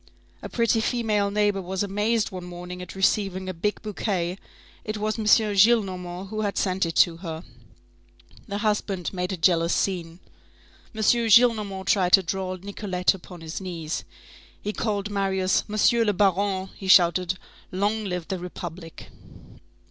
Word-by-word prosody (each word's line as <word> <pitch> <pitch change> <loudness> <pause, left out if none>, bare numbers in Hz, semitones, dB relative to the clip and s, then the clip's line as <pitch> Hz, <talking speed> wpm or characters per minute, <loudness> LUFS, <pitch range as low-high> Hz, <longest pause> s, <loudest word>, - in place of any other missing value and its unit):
A - - -7
pretty 230 -1 +1
female 220 -4 0
neighbor 205 -1 +1
was 190 +2 -3
amazed 210 +3 0
one 185 -1 -7
morning 180 +1 -8
at 180 - -9
receiving 190 -1 0
a 185 - -3
big 205 +5 -2
bouquet; 190 -3 -2 0.4
it 215 0 -4
was 215 +2 -2
M. 215 - -3
Gillenormand 195 -4 +3
who 215 +1 -3
had 200 -2 -2
sent 185 -2 +1
it 165 - -5
to 170 -2 +4
her. 165 -2 -6 1.0
The 200 -1 -3
husband 205 -4 -1
made 180 0 -2
a 190 - -3
jealous 170 0 +3
scene. 175 -3 -2 0.8
M. 220 - -3
Gillenormand 220 -4 +4
tried 185 -3 +2
to 195 - +8
draw 185 +1 -3
Nicolette 185 -1 -1
upon 180 -2 -11
his 165 +3 -6
knees. 170 -4 -4 0.6
He 210 - -4
called 210 -2 -2
Marius, 190 -2 +1
"M. 210 - -3 0.2
le 210 -2 +2
Baron." 195 0 +1
He 195 - -8
shouted: 180 0 +4 0.3
"Long 205 +3 -1
live 180 -3 -4
the 190 - -3
Republic!" 175 -1 -8
190 Hz, 150 wpm, -25 LUFS, 180-210 Hz, 1.0 s, to